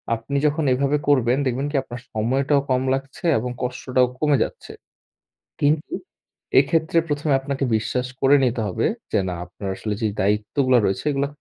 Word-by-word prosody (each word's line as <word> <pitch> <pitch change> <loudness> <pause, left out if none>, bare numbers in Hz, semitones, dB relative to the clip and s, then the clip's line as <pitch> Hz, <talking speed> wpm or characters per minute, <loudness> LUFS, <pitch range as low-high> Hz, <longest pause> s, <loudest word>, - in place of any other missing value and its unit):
আপনি 115 +5 -3
যখন 150 +2 +1
এভাবে 140 +3 +1
করবেন, 130 -3 +3
দেখবেন 130 +2 -1
কি? - - -5
আপনার 120 -2 -8
সময়টাও 135 +6 +1
কম 130 0 +2
লাগছে 135 +4 -5
এবং 125 +3 -3
কষ্টটাও 125 0 +1
কমে 150 -3 +3
যাচ্ছে। - - -8 0.9
কিন্তু 150 - +1 0.7
এক্ষেত্রে 165 0 +2
প্রথমে 145 -1 0
আপনাকে 135 0 -3
বিশ্বাস 125 +3 -2
করে 135 +2 +6
নিতে 120 -2 +1
হবে 90 - -1 0.3
যে, - - +2
না, - - -3
আপনার 95 +3 -8
আসলে 105 +2 -3
যে 110 - +2
দায়িত্বগুলো 110 +6 +2
রয়েছে, 95 +9 -1
এগুলা 140 0 0
135 Hz, 160 wpm, -22 LUFS, 120-145 Hz, 0.9 s, করে